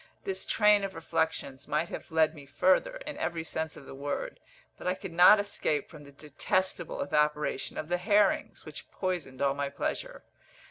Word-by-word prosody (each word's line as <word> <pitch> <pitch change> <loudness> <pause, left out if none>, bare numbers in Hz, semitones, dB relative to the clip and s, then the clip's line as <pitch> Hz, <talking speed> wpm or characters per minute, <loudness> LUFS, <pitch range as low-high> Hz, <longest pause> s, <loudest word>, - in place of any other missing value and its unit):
This 190 -1 -3
train 210 -1 +4
of 195 -1 -4
reflections 160 -4 -2
might 155 +4 0
have - - -7
led 160 -1 +3
me 145 -3 -12
further, 190 - +2
in - - -6
every 170 -1 -2
sense 160 -1 -4
of 140 - -12
the - - -10
word; 145 - -4 0.4
but - - -7
I 180 - +1
could 190 -1 -8
not 180 +5 +8
escape 180 -7 -2
from 150 -3 -12
the 140 - -13
detestable 150 +6 -2
evaporation 150 +1 0
of 155 - -4
the 175 +1 0
herrings, 205 +1 +2
which - - -9
poisoned 175 -9 -3
all 140 -1 +3
my 140 0 -2
pleasure. - - -4
160 Hz, 180 wpm, -29 LUFS, 145-190 Hz, 0.4 s, not